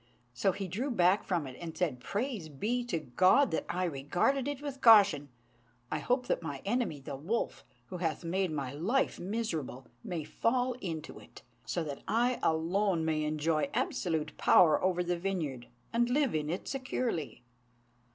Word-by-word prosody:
So 125 +11 +2
he 195 +1 -5
drew 225 - -2
back 185 -4 +3
from 175 -5 -1
it, 130 -1 -8
and 165 -2 -6
said, 155 -9 0
"Praise 205 - -3
be 220 - -1
to 195 -9 -1
God 185 - +4
that - - -2
I 185 - -1
regarded 175 - 0
it 285 -2 -3
with 280 -2 -6
caution! 200 - +6 0.6
I 155 - 0
hope 250 - 0
that - - 0
my 145 -5 -6
enemy, 225 - 0
the 135 +1 -6
wolf, 185 +13 -2 0.3
who 180 - -5
hath 165 -1 -2
made 185 +2 0
my 140 -4 -3
life 205 - 0
miserable, 175 - -3 0.2
may 170 -4 -3
fall 245 - 0
into 160 -4 -5
it, - - -15 0.2
so 165 +9 -1
that 145 -3 -6
I 240 +4 +2
alone 170 +2 +1
may 155 -1 0
enjoy 155 - 0
absolute 160 -4 -1
power 165 -3 +5
over 180 -1 +2
the 175 0 -1
vineyard, 160 -10 -3 0.3
and 240 +1 +2
live 275 0 +2
in 150 -1 -1
it 175 +4 -3
securely." 255 - -3
180 Hz, 170 wpm, -31 LUFS, 155-230 Hz, 0.6 s, caution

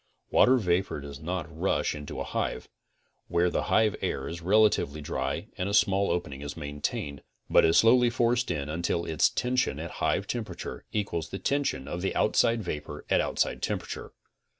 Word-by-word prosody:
Water 130 +1 +6
vapor 90 -6 0
does 70 0 -8
not 85 +2 -3
rush 90 +5 0
into 75 -1 -7
a - - -1
hive, - - -3 0.6
where 85 +1 +2
the - - -1
hive 110 -2 +3
air 65 - -2
is 85 +1 -6
relatively 100 -5 +3
dry 70 -2 -3
and 90 +2 -1
a 100 - +1
small 100 -2 +3
opening 80 -6 -2
is 70 +1 -6
maintained, 75 -1 -4 0.3
but - - +6
is 80 - +4
slowly 120 +2 +6
forced 120 +1 +1
in 70 -1 -2
until 85 +2 -1
its 80 - +3
tention 125 - 0
at 85 +2 -5
hive 80 +5 +1
temperature 115 +1 -5
equals 85 -6 -2
the 95 - -4
tention 135 - -1
of 90 - -4
the 95 - -1
outside 115 +1 +2
vapor 75 -3 -5
at - - +5
outside - - -1
temperature. - - -4
90 Hz, 175 wpm, -28 LUFS, 75-110 Hz, 0.6 s, Water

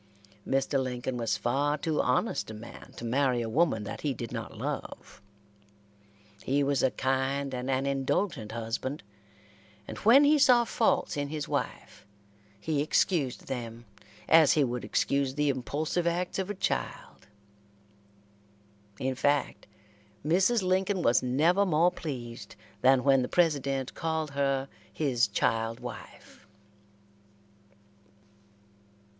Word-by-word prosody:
Mr. 135 0 +1
Lincoln 125 0 -3
was 115 -2 -1
far 145 +5 0
too 155 +1 0
honest 125 - 0
a 110 - -7
man 110 +2 -11
to 120 - -6
marry 125 0 +1
a - - -4
woman 130 -3 +1
that - - -7
he 145 -3 -1
did 115 0 -6
not - - -6
love. - - -6 1.2
He 140 +2 +1
was 140 -1 +1
a 130 - +3
kind 135 +1 -1
and 125 +1 -4
an 135 +1 0
indulgent 135 - -1
husband, 115 +5 -4 0.8
and - - -7
when 245 +7 +6
he 295 +1 +5
saw 250 -3 +6
faults 230 -1 0
in 145 0 -1
his 150 0 -4
wife - - -5 0.5
he 150 +5 -1
excused 150 -3 0
them 120 -2 -6 0.4
as 160 -3 +6
he 150 - +3
would 125 -2 -2
excuse 140 -1 0
the 150 0 +1
impulsive 150 +6 -1
acts 175 +2 -1
of 190 0 -2
a 205 - -3
child. 140 - -4 1.7
In 130 +3 -1
fact, 145 +2 0 0.6
Mrs. 190 +7 +3
Lincoln 185 0 +1
was 120 - +4
never 155 +10 +2
more 175 -1 +3
pleased 125 -9 -7 0.3
than 130 -1 +4
when 135 -1 +4
the 125 - -1
President 140 -6 +1
called 160 -2 -2
her 135 -1 0 0.2
his 125 -7 +1
child 115 +2 -1
wife. - - -11
140 Hz, 130 wpm, -29 LUFS, 125-160 Hz, 1.7 s, when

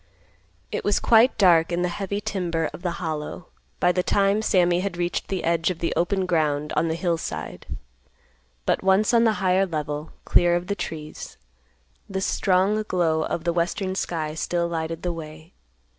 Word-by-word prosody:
It - - -3
was 205 - +2
quite 230 +3 +5
dark 175 -4 +5
in 175 +1 0
the - - +2
heavy 195 +3 -3
timber 170 -6 -2
of - - -9
the 175 -2 -2
Hollow 160 0 -5 0.3
by 180 - +4
the 180 - +1
time 200 +3 +2
Sammy 180 -4 +3
had 190 -2 -3
reached 175 0 -2
the 190 -3 -3
edge 165 0 +1
of 180 - -3
the 170 - -1
open 190 +2 +1
ground 150 -4 0
on 165 - +2
the 160 - -1
hill 170 -1 0
side, 80 - -6 1.0
but - - +1
once 195 +4 +3
on 235 0 +5
the 220 - +4
higher 185 +1 +3
level, 150 -2 -4
clear 175 0 +4
of 175 0 -1
the 200 - -1
trees, 155 -5 -7 0.7
the 190 -1 -2
strong 190 +2 +2
glow 165 -3 +1
of 160 - -3
the 170 0 0
western 185 +3 -1
sky 160 -5 -2
still 170 +2 -1
lighted 165 -1 -4
the 175 -1 -1
way. 155 0 -10
175 Hz, 180 wpm, -24 LUFS, 160-190 Hz, 1.0 s, quite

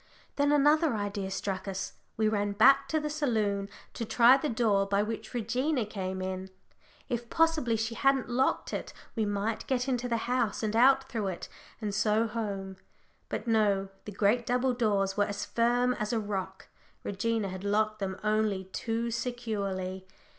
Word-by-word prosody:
Then 285 0 +2
another 295 -1 +4
idea 205 -2 -3
struck 195 0 -3
us 190 0 -4 0.2
we 220 0 +2
ran 205 -1 0
back 275 +6 +6
to 315 +3 +1
the 300 - -3
saloon 220 -10 0 0.2
to 235 - -4
try 235 +3 +6
the 285 +2 -1
door 215 -4 +2
by 200 +1 +2
which 225 +3 -5
Regina 245 +3 0
came 190 -3 -4
in. 185 0 -4 0.6
If 240 -2 -3
possibly 320 -8 +2
she 225 +1 -2
hadn't 270 +2 +2
locked 250 +2 0
it, - - -4 0.2
we 220 -2 +1
might 205 +2 -2
get 255 -1 0
into 250 -2 -1
the 230 - +1
house, 245 -3 0
and 215 0 -1
out 265 +3 +5
through 220 -6 -2
it, 185 -2 -5 0.3
and 210 -3 -3
so 215 +1 +2
home. 200 -4 -4 0.5
But - - -3
no 205 -4 +2 0.2
the 210 - -6
great 210 +4 +1
double 250 +1 +2
doors 200 -5 +1
were 205 - +4
as 205 0 -4
firm 245 +2 +2
as 215 -3 -3
a 230 - +1
rock. 190 -2 -5 0.3
Regina 215 +1 -1
had 185 +1 -7
locked 215 +1 +1
them 190 -2 -3
only 215 -2 +1
too 230 +1 -2
securely! 200 -6 -3
220 Hz, 170 wpm, -29 LUFS, 200-245 Hz, 0.6 s, back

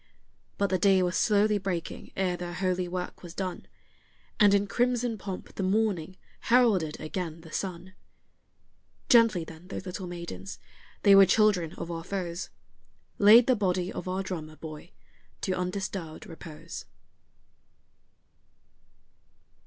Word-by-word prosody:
But 200 -2 0
the 185 - +2
day 190 0 +4
was 180 0 0
slowly 210 -1 +3
breaking 185 -4 -4
ere 185 -2 +1
their 175 0 -6
holy 185 -1 0
work 180 0 -5
was 175 -1 -10
done, 185 -2 -4 0.7
And 205 -1 +6
in 200 0 +2
crimson 245 +2 0
pomp 190 -1 -7
the - - -4
morning 190 -3 0 0.2
heralded 220 -11 +3
again 165 0 -5
the 160 -1 -13
sun. 185 0 -5 1.2
Gently 230 -7 +5
then 160 +2 -12
those 190 - -6
little 185 0 -5
maidens 170 - -7 0.5
they 200 - +7
were 195 -1 +8
children 195 -7 +3
of 170 - -6
our 165 -1 -5
foes 180 -2 -4 0.7
Laid 220 +3 +8
the 255 - +4
body 185 -3 0
of - - -6
our 185 +1 -1
drummer 160 -5 -6
boy 155 +1 -9 0.5
to 190 - 0
undisturbed 180 -3 -4
repose. 160 -2 -9
185 Hz, 130 wpm, -28 LUFS, 170-200 Hz, 1.2 s, were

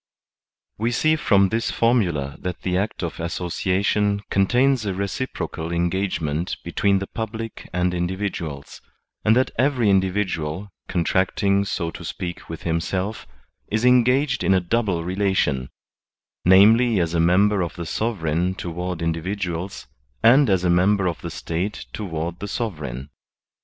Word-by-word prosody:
Wb 120 +2 0
sex 155 +1 +2
from 100 -2 +4
this 115 +3 -1
formula 90 - +1
that 90 -1 -5
the 90 -1 0
act 100 +1 -2
of 85 - -4
association 95 +4 0
contains 125 +6 +3
a 100 -3 -2
reciprocal 100 -4 -4
engagement 85 -2 -1
between 100 -1 +1
the 100 - -3
public 115 +1 -6
and 90 0 0
individuals, 85 -5 -4 0.4
and 110 - +4
that 130 +1 +2
every 125 -6 +3
individual, 95 -2 0 0.2
contracting 95 +2 +1
so 85 -4 -2
to 85 - -9
speak 90 +1 -6
with 80 0 -7
himself, 90 +5 -2 0.4
is 110 +3 0
engaged 125 +3 +3
in 95 - +4
a - - +4
double 95 -2 0
relation, 90 -8 0 0.8
vis, 110 +4 +6
as 85 -1 0
a 85 - +1
member 95 +4 +3
of 85 -2 -3
the 85 - -5
sovereign 90 -4 -1
toward 90 -1 -4
individuals, 90 +2 -3 0.4
and 130 +3 +6
as 95 -2 +2
a 90 - +2
member 95 +3 +3
of 85 - -3
the - - -5
State 90 +6 -4
toward 85 -4 -4
the 100 - -5
sovereign. 75 - -4
95 Hz, 135 wpm, -23 LUFS, 85-105 Hz, 0.8 s, vis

